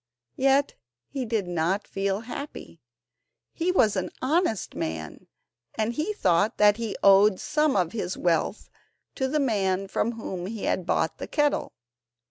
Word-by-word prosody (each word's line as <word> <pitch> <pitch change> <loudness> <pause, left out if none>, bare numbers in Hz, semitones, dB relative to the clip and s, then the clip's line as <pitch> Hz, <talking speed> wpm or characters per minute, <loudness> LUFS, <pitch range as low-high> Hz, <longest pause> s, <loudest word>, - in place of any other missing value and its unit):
Yet 275 +1 +3 0.4
he 265 -3 -3
did 220 -3 0
not 175 +4 -1
feel 195 +1 -1
happy. 280 +5 -8 0.7
He 350 +2 0
was 220 - +3
an 185 - -1
honest 275 - 0
man, 80 -1 -5 0.5
and 220 +1 -1
he 310 - -1
thought 185 - +2
that 210 0 +5
he 230 -3 -3
owed 195 0 +6
some 300 -2 +1
of 180 -4 +1
his 185 -5 -3
wealth 175 +4 0 0.4
to 265 - -1
the 300 +3 0
man 195 -7 0
from 230 +4 -1
whom 185 -5 -5
he 220 0 -6
had 185 -1 -1
bought - - 0
the - - -5
kettle. 295 -1 0
210 Hz, 150 wpm, -26 LUFS, 190-265 Hz, 0.7 s, owed